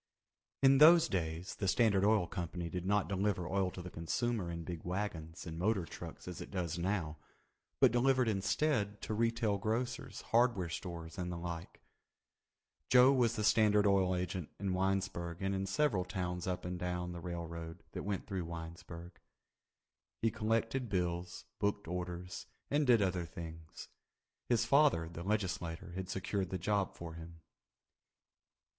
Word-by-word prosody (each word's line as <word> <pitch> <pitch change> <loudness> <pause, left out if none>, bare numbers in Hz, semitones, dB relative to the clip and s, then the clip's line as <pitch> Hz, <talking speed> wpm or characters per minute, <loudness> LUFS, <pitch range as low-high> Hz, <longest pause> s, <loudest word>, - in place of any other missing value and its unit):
In 135 0 +7
those 165 +2 +8
days 85 0 -2
the 100 - -3
Standard 100 -1 +4
Oil 105 -3 +4
Company 85 0 -4
did 90 +1 -3
not 105 0 +2
deliver 95 -2 0
oil 95 -1 +1
to 90 -1 -8
the 90 - -8
consumer 100 +4 -1
in 85 0 -4
big 85 -1 -6
wagons 90 -3 -4
and 80 -1 -6
motor 95 -1 +1
trucks 85 0 -9
as 90 - -6
it - - -7
does 85 -3 -2
now, 85 -5 -1 0.6
but - - +6
delivered 125 +1 +3
instead 105 0 +1
to - - -2
retail 115 -2 +1
grocers, 115 +5 -2
hardware 115 -7 +2
stores, 85 -1 -6
and 90 0 -2
the 85 - -4
like. 85 0 -6 1.1
Joe 125 +2 +7
was 120 -3 +3
the 110 - -1
Standard 105 -1 +5
Oil 95 -2 +3
agent 90 -2 -3
in 100 -2 -1
Winesburg 95 -2 -1
and 95 0 -1
in 95 0 -1
several 105 -2 +2
towns 90 -1 -3
up 90 -1 -2
and 90 0 -3
down 90 0 -2
the 85 -1 -7
railroad 85 0 -6
that - - -5
went 100 -1 -3
through 95 -3 -3
Winesburg. 85 +1 -8 1.0
He 115 - +3
collected 115 +4 0
bills, 90 -2 -2
booked 100 -2 0
orders, 90 +1 -5 0.2
and 145 0 +2
did 115 -4 +6
other 90 -3 -1
things. 80 0 -9 0.6
His 120 -2 +3
father, 140 - +4
the 85 0 -8
legislator, 90 -4 -2
had 95 +1 -5
secured 95 0 -2
the 95 - -2
job 100 +1 0
for 85 -1 -7
him. 85 0 -10
95 Hz, 155 wpm, -34 LUFS, 85-105 Hz, 1.1 s, those